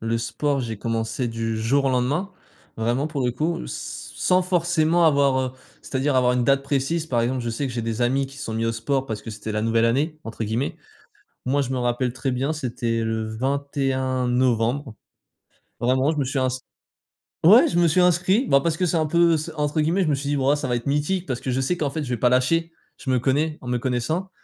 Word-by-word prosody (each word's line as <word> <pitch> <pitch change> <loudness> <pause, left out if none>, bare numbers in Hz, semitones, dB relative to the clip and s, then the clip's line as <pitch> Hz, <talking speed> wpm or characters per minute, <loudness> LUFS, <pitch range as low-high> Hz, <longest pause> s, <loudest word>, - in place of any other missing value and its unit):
Le 115 +1 -1
sport, 120 +5 -1
j'ai 115 -3 -4
commencé 115 +4 -2
du 115 -1 -3
jour 125 +6 +1
au - - +3
lendemain, 135 +10 0 0.5
vraiment, 120 +5 0
pour 145 -4 -3
le 125 - +2
coup 165 +7 -2
s - - -7
sans 185 0 +3
forcément 175 -2 +2
avoir, 140 -3 +3
heu, 130 -1 -2 0.3
c'est-à-dire, 135 +1 0
avoir 125 -1 +4
une 125 -1 +1
date 135 +1 +3
précise. 140 +4 -1
Par 120 -6 0
exemple, 125 +2 -1
je 120 - -2
sais 125 +5 -2
que 130 - -5
j'ai 120 -1 -3
des 115 0 -3
amis 135 +3 +1
qui 135 +1 -13
se - - -6
sont 110 - -4
mis 115 +1 -1
au 115 - 0
sport 130 +4 -1
«parce 110 -4 -4
que - - -10
c'était 105 +1 -6
la 105 - -1
nouvelle 115 0 +2
année», 145 +7 0
entre 115 0 -5
guillemets. 115 +6 -2 0.7
Moi, 140 +3 +1
je 130 - -3
me 130 - -1
rappelle 120 +1 0
très 130 +1 -2
bien, 130 +4 -1
c'était 120 -5 -2
le 110 -1 -2
21 130 0 -1
novembre, 125 0 +1 0.8
vraiment, 130 +4 +2
je 160 - -4
me 140 - +1
suis 135 +1 -1
ins 130 - +2 1.0
ouais, 215 +9 +8
je 175 - +1
me 170 - +5
suis 175 +3 +3
inscrit, 180 - +3
ben, 140 - +6
parce 165 +1 0
que 185 - +1
c'est 175 -1 +1
un 160 - +1
peu 170 +1 +4
c'est 155 +2 -5
entre 150 0 -1
guillemets 170 +6 +2
je 160 - 0
me 145 - +2
suis 140 +1 -5
dit: 145 - +1
«Bah, 135 +2 +3
ça 145 - -3
va 125 - 0
être 120 - -4
mythique». 150 +6 0
Parce 130 -6 -3
que - - -5
je 130 +1 0
sais 135 +7 0
qu'en 150 -3 -1
fait, 150 +2 -4
je 130 - -6
vais 125 - -1
pas 125 +2 +3
lâcher, 165 +7 +2 0.3
je 135 - -7
me 130 - +3
connais, 150 +5 0
en 125 - -10
me 125 0 0
connaissant. 130 +10 -2
135 Hz, 240 wpm, -23 LUFS, 120-150 Hz, 1.0 s, ouais